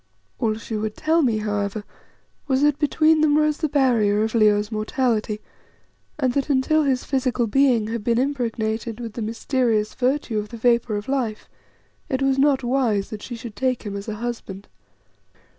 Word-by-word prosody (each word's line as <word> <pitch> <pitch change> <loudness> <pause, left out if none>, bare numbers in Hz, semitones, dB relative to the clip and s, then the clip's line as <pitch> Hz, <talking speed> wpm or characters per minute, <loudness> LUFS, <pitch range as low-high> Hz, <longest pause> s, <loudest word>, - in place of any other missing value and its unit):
All 215 -1 +1
she 225 0 -6
would 215 0 -3
tell 320 +2 +2
me, 235 -7 +2
however, 205 0 -2 0.6
was 265 0 +2
that 295 -1 +3
between 310 +1 +3
them 300 -1 +4
rose 305 -1 +2
the 310 - 0
barrier 230 -7 +2
of 220 - -2
Leo's 210 -1 +3
mortality, 215 -1 -1 0.8
and 260 -4 0
that 280 +2 -1
until 285 +3 +3
his 270 -4 +1
physical 255 -3 0
being 245 -1 +3
had 230 -1 -3
been 230 +1 +1
impregnated 230 -4 -2
with 230 -3 -6
the 235 - -5
mysterious 225 -1 0
virtue 255 -3 0
of 210 0 -6
the 235 - -8
Vapour 235 -1 +2
of 205 +1 -4
Life, 250 -6 -2 0.6
it 265 +1 -1
was 270 0 +2
not 275 -2 +3
wise 240 -6 0
that 215 -1 -6
she 240 - -6
should 230 -2 -9
take 255 0 -1
him 205 -2 -5
as 200 0 -6
a 215 - -3
husband. 215 -4 -6
235 Hz, 175 wpm, -23 LUFS, 215-270 Hz, 0.8 s, them